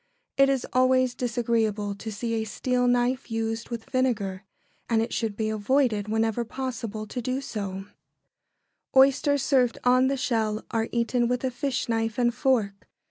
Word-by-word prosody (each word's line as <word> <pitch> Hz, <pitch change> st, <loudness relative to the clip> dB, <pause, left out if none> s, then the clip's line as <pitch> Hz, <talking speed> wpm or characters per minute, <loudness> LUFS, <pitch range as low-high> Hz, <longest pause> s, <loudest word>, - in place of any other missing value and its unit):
It 275 Hz, 0 st, +5 dB
is 270 Hz, -2 st, 0 dB
always 255 Hz, 0 st, +3 dB
disagreeable 230 Hz, -4 st, -1 dB
to 220 Hz, +2 st, -7 dB
see 230 Hz, +2 st, -3 dB
a 225 Hz, -1 st, 0 dB
steel 250 Hz, +3 st, 0 dB
knife 245 Hz, +1 st, +1 dB
used 225 Hz, 0 st, -3 dB
with 235 Hz, -2 st, -6 dB
vinegar, 215 Hz, -7 st, 0 dB, 0.5 s
and 230 Hz, -2 st, +3 dB
it 225 Hz, +2 st, -1 dB
should 220 Hz, -3 st, -2 dB
be 220 Hz, -, -1 dB
avoided 220 Hz, 0 st, +1 dB
whenever 225 Hz, +1 st, 0 dB
possible 235 Hz, -3 st, -5 dB
to 245 Hz, +4 st, -5 dB
do 255 Hz, +3 st, -2 dB
so. 230 Hz, -7 st, -4 dB
[Sidenote: 195 Hz, 0 st, -7 dB
Oysters.] -, -, -23 dB, 1.1 s
Oysters 275 Hz, +1 st, +4 dB
served 255 Hz, -4 st, +2 dB
on 255 Hz, +1 st, +4 dB
the 275 Hz, +1 st, 0 dB
shell 220 Hz, -4 st, -1 dB
are 225 Hz, 0 st, -1 dB
eaten 235 Hz, +1 st, +1 dB
with 250 Hz, +1 st, -1 dB
a 260 Hz, -, 0 dB
fish 260 Hz, +1 st, -2 dB
knife 225 Hz, -1 st, -1 dB
and 240 Hz, -1 st, +2 dB
fork. 230 Hz, -8 st, 0 dB
235 Hz, 170 wpm, -26 LUFS, 220-255 Hz, 1.1 s, It